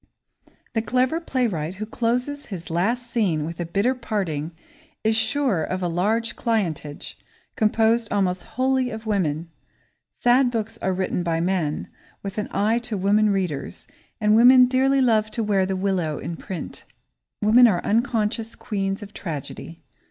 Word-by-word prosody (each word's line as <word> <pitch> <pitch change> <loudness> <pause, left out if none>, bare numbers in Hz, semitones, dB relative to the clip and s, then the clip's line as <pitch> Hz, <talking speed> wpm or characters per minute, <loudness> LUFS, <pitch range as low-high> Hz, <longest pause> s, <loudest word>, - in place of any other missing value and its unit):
The 225 - +1
clever 255 +7 +1
playwright 200 - -1
who 215 +3 -4
closes 245 +6 -2
his 175 -6 -7
last 235 +8 -1
scene 175 -10 +1
with 165 +2 -6
a 175 - -3
bitter 200 +9 +1
parting 190 - -3 0.5
is 220 0 +2
sure 225 - +1
of 185 +2 -3
a - - +1
large 210 +7 0
clientage, 170 - -2 0.4
composed 225 +1 +2
almost 185 -3 +1 0.2
wholly 260 -1 +2
of 220 -1 -7
women. 170 -6 -1 0.7
Sad 245 +1 +4
books 225 -1 -4
are 190 - 0
written 185 -1 -1
by 165 -1 0
men, 170 -4 -1 0.4
with 200 +1 -4
an 210 - -2
eye 220 +3 +1
to 240 -3 -4
women 205 +3 +3
readers, 180 -9 -2 0.3
and 210 -1 +4
women 250 +2 +8
dearly 265 +2 +2
love 220 -4 +3
to 230 - -2
wear 195 -3 +2
the 190 - -1
willow 185 -6 -1
in 170 - -5
print. 180 -2 -7 0.6
Women 230 +4 +6
are 180 -6 +1
unconscious 225 0 0
queens 195 -1 -3
of 205 0 -11
tragedy. 165 0 -6
210 Hz, 150 wpm, -23 LUFS, 180-235 Hz, 0.7 s, women